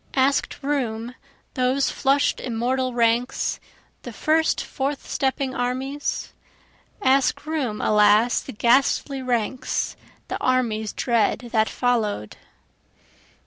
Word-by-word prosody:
Ask'd 270 +1 +1
room 245 -5 -2 0.4
those 255 +2 +1
flush'd 275 +1 +1
immortal 255 +2 -1
ranks, 235 +1 +1 0.4
the - - -8
first 315 +1 +1
forth 275 +1 -3
stepping 265 0 -1
armies? 265 +3 -3 0.7
Ask 270 +2 +2
room 280 -9 -2
alas 210 +3 +4
the - - -8
ghastly 265 +4 +2
ranks, 250 0 -1 0.3
the - - -4
armies 225 -4 0
dread 235 0 0
that 220 -1 +2
follow'd. 220 - -1
255 Hz, 100 wpm, -23 LUFS, 230-270 Hz, 0.7 s, alas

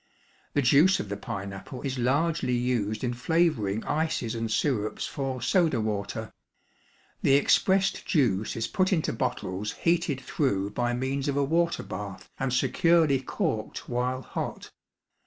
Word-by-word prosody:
The 145 - +3
juice 150 +9 +5
of 100 - -4
the 100 - -2
pineapple 100 +4 -6
is 135 -2 -2
largely 140 +1 +1
used 120 -3 -1
in 125 -1 0
flavoring 125 - +1
ices 155 -7 -1
and 115 -1 -3
syrups 110 -2 0
for 135 -3 -4
soda 160 -1 +3
water; 110 +1 -3 0.9
the 135 - +5
expressed 190 +6 +3
juice 110 - +1
is 115 - -1
put 185 0 +1
into 165 -5 +1
bottles 95 +3 -2
heated 170 -5 +1
through 105 -7 -1
by 120 +3 0
means 130 +3 -2
of 140 -1 0
a 140 - +3
water 170 +4 +1
bath 95 0 -7
and 135 -1 0
securely 140 +3 +3
corked 130 - -3
while 125 +1 -1
hot. - - -5
130 Hz, 140 wpm, -27 LUFS, 110-155 Hz, 0.9 s, juice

